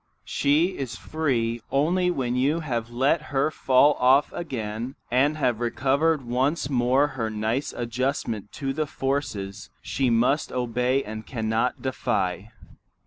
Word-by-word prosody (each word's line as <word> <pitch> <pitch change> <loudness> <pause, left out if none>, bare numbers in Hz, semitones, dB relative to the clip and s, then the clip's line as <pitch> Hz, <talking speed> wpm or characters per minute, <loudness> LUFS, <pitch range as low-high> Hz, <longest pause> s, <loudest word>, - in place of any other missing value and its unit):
She 160 +6 +1
is 125 -3 -4
free 120 -8 -1
only 175 +6 +2
when 125 -7 -1
you 145 +6 +1
have 120 -7 -3
let 135 +6 +2
her 140 +2 +1
fall 140 +1 +4
off 130 +3 +4
again 120 -6 -4 0.2
and 140 +5 +3
have 125 -6 +1
recovered 140 +5 +1
once 135 +5 0
more 130 +3 +3
her 120 -6 -3
nice 110 +5 -1
adjustment 120 -3 -2
to 135 -1 -3
the 155 +1 -1
forces 110 -9 -3
she 135 -2 0
must 120 +6 +2
obey 125 +2 0
and 110 +1 -7
cannot 110 0 -1
defy. 105 -6 -1
130 Hz, 135 wpm, -25 LUFS, 115-145 Hz, 0.2 s, fall